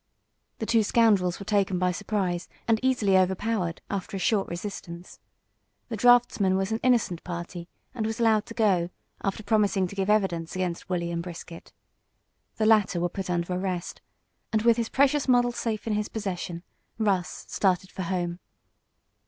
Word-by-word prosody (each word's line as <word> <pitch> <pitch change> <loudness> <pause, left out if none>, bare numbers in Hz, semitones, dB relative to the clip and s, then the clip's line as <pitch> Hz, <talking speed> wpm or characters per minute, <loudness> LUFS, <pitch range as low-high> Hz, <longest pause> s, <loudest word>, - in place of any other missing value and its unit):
The 220 - -3
two 225 0 +3
scoundrels 205 -5 +3
were 200 - -7
taken 195 -3 +1
by 180 0 +2
surprise 185 -2 -2 0.2
and 225 -1 +3
easily 245 -7 +2
overpowered, 185 -1 0
after 195 0 -4
a - - -4
short 200 +1 +1
resistance. 175 -1 -7 0.7
The 230 - -3
draughtsman 225 -4 +4
was 195 +2 -1
an 220 - 0
innocent 235 -9 +2
party, 175 0 -6 0.2
and 225 -4 -2
was 220 +1 -4
allowed 220 -2 +3
to 230 - -9
go, 190 -7 +2 0.3
after 195 +2 -2
promising 205 -2 +2
to 185 - -7
give 195 0 -1
evidence 190 -6 +1
against 180 -1 -3
Wolley 170 -2 -1
and 170 0 -2
Brisket. 170 -1 -9 0.8
The 220 - 0
latter 210 -5 +4
were 175 +1 0
put 190 +1 -5
under 175 0 -1
arrest, 180 -1 -3 0.5
and 220 -1 +1
with 235 0 +5
his 230 -1 -1
precious 280 +1 +2
model 245 -1 +4
safe 225 -3 -3
in 225 - 0
his 210 0 -1
possession 180 -5 -4 0.3
Russ 195 -5 -1
started 190 -1 0
for - - -6
home. 175 -1 -2
195 Hz, 165 wpm, -27 LUFS, 180-220 Hz, 0.8 s, with